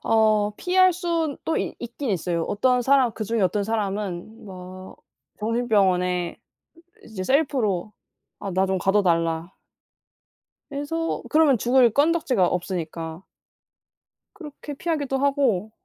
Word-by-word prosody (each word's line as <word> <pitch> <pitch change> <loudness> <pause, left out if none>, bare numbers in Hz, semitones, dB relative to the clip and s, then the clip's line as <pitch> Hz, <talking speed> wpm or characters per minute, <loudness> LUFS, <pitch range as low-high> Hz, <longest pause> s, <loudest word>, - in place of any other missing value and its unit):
어 215 -2 +3
피할 370 0 +4
순 335 -4 -1
또 320 - 0
이 - - -2
있긴 240 +2 -5
있어요. 175 -2 -1
어떤 250 +4 +1
사람 265 -2 +3
그중에 220 +1 -2
어떤 200 +2 +1
사람은 205 -1 -3
뭐 185 -1 -10 0.4
정신병원에 190 -6 +1 0.7
이제 210 -4 -6
셀프로 230 - +1 0.5
"아 200 - -4
나 190 +2 +2
좀 190 0 0
가둬 195 +3 +2
달라" 165 -1 0 1.2
이래서 290 +4 -3
그러면 305 -5 +4
죽을 245 +1 +4
건덕지가 285 - +2
없으니까 170 -1 -4 1.1
그렇게 295 -2 -9
피하기도 290 -4 -2
하고. 265 -8 +1
220 Hz, 250 characters per minute, -24 LUFS, 185-280 Hz, 1.2 s, 피할